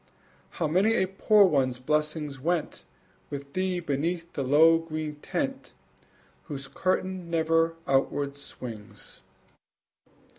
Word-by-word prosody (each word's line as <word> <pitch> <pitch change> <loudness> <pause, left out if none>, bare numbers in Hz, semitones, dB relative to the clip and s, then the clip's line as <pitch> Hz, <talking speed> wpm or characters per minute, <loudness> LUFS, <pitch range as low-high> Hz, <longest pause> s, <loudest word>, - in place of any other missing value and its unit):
How 165 - 0
many 190 +8 +3
a 190 - +3
poor 200 +2 +4
one's 135 -7 +2
blessing 150 +2 -1
went 170 +1 -2 0.4
With 140 0 -7
thee 185 -1 0
beneath 165 +2 -2
the 140 - -2
low 160 +5 +6
green 155 -2 -5
tent 270 - -4 0.7
Whose 140 -4 -6
curtain 185 -1 -1
never 165 0 +2
outward 140 +1 +1
swings! 115 -6 -9
160 Hz, 110 wpm, -27 LUFS, 140-180 Hz, 0.7 s, low